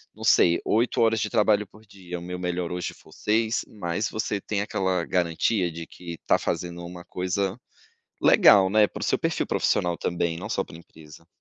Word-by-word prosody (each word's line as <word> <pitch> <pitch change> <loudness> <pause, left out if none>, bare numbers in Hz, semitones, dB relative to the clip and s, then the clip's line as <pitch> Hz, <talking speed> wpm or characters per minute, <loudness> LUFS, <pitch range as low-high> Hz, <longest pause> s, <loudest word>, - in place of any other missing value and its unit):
não - - -10
sei, 85 0 +4
8 115 +3 +1
horas 115 -1 +3
de 105 - -1
trabalho 105 0 +2
por 110 +3 -19
dia, 90 -3 -8
o - - -8
meu 90 +1 -6
melhor 90 -1 -2
hoje 90 -1 -3
for 80 - -19
6", 110 +5 0
mas 100 +1 -3
você 105 -1 -2
tem 100 +1 -2
aquela 95 -4 -1
garantia 90 +3 0
de 85 0 -7
que 85 +1 -10
está 85 - +1
fazendo 85 0 -3
uma 90 0 -9
coisa 95 +3 -2 0.7
legal, 95 -2 +6
né, 105 0 +5
para - - -9
o - - -2
seu - - +1
perfil - - -1
profissional 85 -1 +1
também, 85 -1 -1
não 100 +4 -6
só 95 - 0
pra - - -12
empresa. 80 -1 -15
90 Hz, 195 wpm, -25 LUFS, 85-105 Hz, 0.7 s, legal